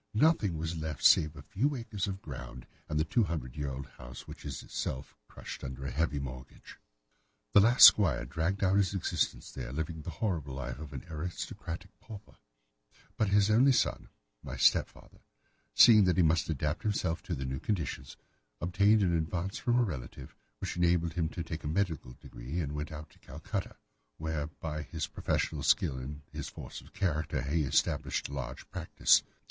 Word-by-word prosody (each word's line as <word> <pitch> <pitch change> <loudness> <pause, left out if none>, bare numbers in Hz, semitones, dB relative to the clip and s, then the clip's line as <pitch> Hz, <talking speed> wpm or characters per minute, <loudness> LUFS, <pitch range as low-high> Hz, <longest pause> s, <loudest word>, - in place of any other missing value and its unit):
Nothing 110 - +3
was 80 +1 -3
left 80 -2 -5
save 75 0 +6
a - - -10
few 140 +8 0
acres 110 -6 -3
of 95 0 -5
ground, 70 -5 -8 0.2
and 75 - 0
the - - +3
two 115 +6 +2
hundred 70 -8 -4
year 75 -2 -2
old 70 +1 -5
house, - - -11
which - - -10
is 70 -4 -5
itself 65 - -5
crushed - - -9
under 65 0 -6
a 65 - -3
heavy 75 +2 0
mortgage. 65 -2 -8 0.7
The - - +8
last 120 +5 +9
squire 80 - +6
dragged 85 +9 -1
out 95 +1 +3
his 100 -1 +2
existence 95 - -1
there, - - -6
living 80 +2 -4
the 75 - -7
horrible 80 -6 -2
life 65 -1 -5
of 75 -2 -8
an - - -7
aristocratic 85 +2 -6
pauper; 105 -3 -12 0.8
but 110 - +1
his 100 +1 +4
only 130 +6 +6
son, - - 0 0.3
my - - -7
stepfather, - - +1 0.6
seeing 110 -4 +8
that 90 0 +2
he 90 - +5
must 80 0 +2
adapt 75 0 -1
himself 90 -6 -1
to 85 - -4
the 65 -1 -4
new 65 0 -3
conditions, 95 -8 -3 0.4
obtained 100 +4 +3
an 85 -2 +2
advance 85 +4 -2
from 120 0 +1
a 125 - +4
relative, 70 - -6 0.2
which - - -5
enabled 85 -1 +2
him 80 -3 0
to 85 - -5
take 80 0 -6
a - - -3
medical 80 -6 -1
degree 60 +6 -7
and 75 -4 -2
went 75 +1 -4
out 75 0 -8
to - - -23
Calcutta, - - -5 0.4
where, 80 -2 -3
by 75 0 -5
his 70 - -4
professional - - -2
skill 65 - +2
and 70 +3 -7
his - - -5
force - - -9
of - - -17
character, 85 -6 -1
he 75 +4 0
established 70 +1 0
a - - -8
large 65 -2 -6
practice. - - +3
80 Hz, 185 wpm, -31 LUFS, 70-95 Hz, 0.8 s, last